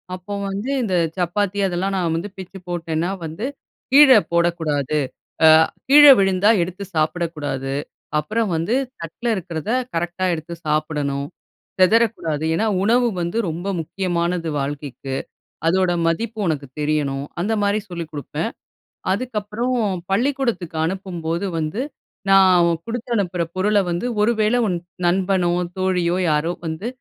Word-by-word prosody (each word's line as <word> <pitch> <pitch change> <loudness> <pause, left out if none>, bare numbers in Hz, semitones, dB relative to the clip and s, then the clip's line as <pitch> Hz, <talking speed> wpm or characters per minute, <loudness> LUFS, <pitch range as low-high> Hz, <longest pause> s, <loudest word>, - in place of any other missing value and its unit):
அப்ப 185 +2 -15 0.2
வந்து 200 +6 -4
இந்த 190 -5 0 0.2
சப்பாத்தி 195 +3 0
அதெல்லாம் 190 +2 -1
நான் 170 -3 0
வந்து 175 +5 -3
பிச்சு 190 0 -9
போட்டேன்னா 170 0 -2 0.2
வந்து, 160 +9 -5 0.5
"கீழ 285 +1 +8 0.2
போடக்கூடாது. 160 -4 +1 0.5
அ - - +9 0.4
கீழ 295 +1 +9 0.2
விழுந்தா 195 +1 +3
எடுத்து 180 +3 -4
சாப்பிடக்கூடாது. 155 -4 -1 0.5
அப்புறம் 215 +8 -1
வந்து 165 +8 -1 0.3
தட்ல 165 +9 -6
இருக்குறத 170 -1 -5 0.2
கரெக்ட்‌டா 175 +2 -2
எடுத்து 165 +1 -5
சாப்பிடணும், 150 -2 -1 0.5
சிதறக்கூடாது. 185 -7 +2
ஏன்னா, 220 - +1 0.2
உணவு 240 +4 +3
வந்து 170 +6 -2
ரொம்ப 175 +5 -5
முக்கியமானது. 170 -1 -2
வாழ்க்கைக்கு 140 -1 -4 0.5
அதோட 185 +1 +3 0.2
மதிப்பு 220 +6 -2
உனக்கு 145 -3 -2
தெரியணும்." 145 -2 0 0.2
அந்த 210 +5 0
மாதிரி 205 +1 +2
சொல்லிக் 170 -3 -6
குடுப்பேன். 145 -1 -4 0.6
அதுக்கு 245 +4 -4
அப்புறம் 230 +5 -2 0.4
பள்ளிக்கூடத்துக்கு 235 - 0
அனுப்பும்போது 175 -1 -3
வந்து 155 +10 -2 0.5
நான் 185 -3 +6 0.2
குடுத்து 235 +1 -5
அனுப்புற 180 -4 0
பொருள்ல 205 +2 +2
வந்து 175 +8 -1
"ஒரு 215 +3 +4
வேளை 215 +3 +3
உன் 185 - 0 0.3
நண்பனோ, 180 0 +2 0.3
தோழியோ 180 -2 +1
யாரோ 150 +3 +1 0.2
வந்து 160 +8 -4
175 Hz, 125 wpm, -21 LUFS, 160-205 Hz, 0.6 s, அ